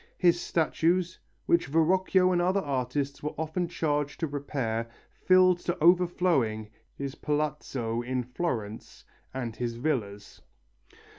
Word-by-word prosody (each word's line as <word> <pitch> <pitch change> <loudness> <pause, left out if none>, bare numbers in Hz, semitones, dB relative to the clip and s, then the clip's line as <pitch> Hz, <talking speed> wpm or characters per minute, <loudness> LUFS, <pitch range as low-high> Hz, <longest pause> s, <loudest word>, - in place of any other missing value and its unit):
His 175 -1 +3
statues, 170 +2 0 0.3
which 170 -4 +2
Verrocchio 185 +4 +3
and 175 -1 +2
other 185 +3 +2
artists 140 0 -2
were 150 - -4
often 160 +3 -2
charged 150 -4 -1
to - - +2
repair, 130 -6 -3 0.2
filled 185 -1 +4
to 175 0 -2
overflowing 165 - +2 0.2
his 140 -1 -4
palazzo 145 -7 -2
in 125 +1 -2
Florence 120 -5 -4 0.3
and 120 -4 -4
his 120 -1 -3
villas. 115 -7 -3
150 Hz, 120 wpm, -28 LUFS, 125-175 Hz, 0.3 s, filled